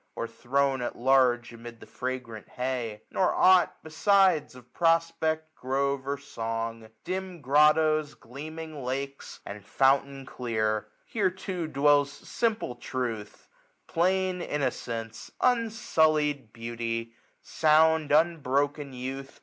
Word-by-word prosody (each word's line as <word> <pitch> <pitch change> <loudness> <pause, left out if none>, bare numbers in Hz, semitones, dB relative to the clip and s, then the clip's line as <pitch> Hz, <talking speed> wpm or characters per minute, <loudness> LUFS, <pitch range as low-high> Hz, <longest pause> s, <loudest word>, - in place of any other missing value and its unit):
Or - - -3
thrown 135 +1 0
at 120 - -3
large 125 -2 +3
amid 115 0 -10
the - - -12
fragrant 125 -4 -6
hay; 125 -4 -3
Nor 185 - +1
ought 185 -1 +5
besides 185 -2 +3
of 125 -1 -16
prospect, 165 -2 +1
grove, 135 0 -1
or 140 0 -1
song. 115 -4 -5
Dim 185 -1 -4
grottoes, 150 +2 +3
gleaming 155 +4 -8
lakes, 135 +2 -5
and 100 0 -8
fountain 135 +3 +1
clear. 110 -4 -2 0.2
127a - - -31
Here 205 -4 +2
too 185 -2 -5
dwells 145 -1 +3
simple 220 - -2
truth; 120 -4 -5 0.4
plain 185 +1 +1
innocencie; 120 -7 -3
Unsullied 155 - +1
beauty; 115 0 -4 0.3
sound 160 -1 +3
unbroken 145 -3 +1
youth. 135 +2 -6
140 Hz, 110 wpm, -28 LUFS, 120-160 Hz, 0.4 s, ought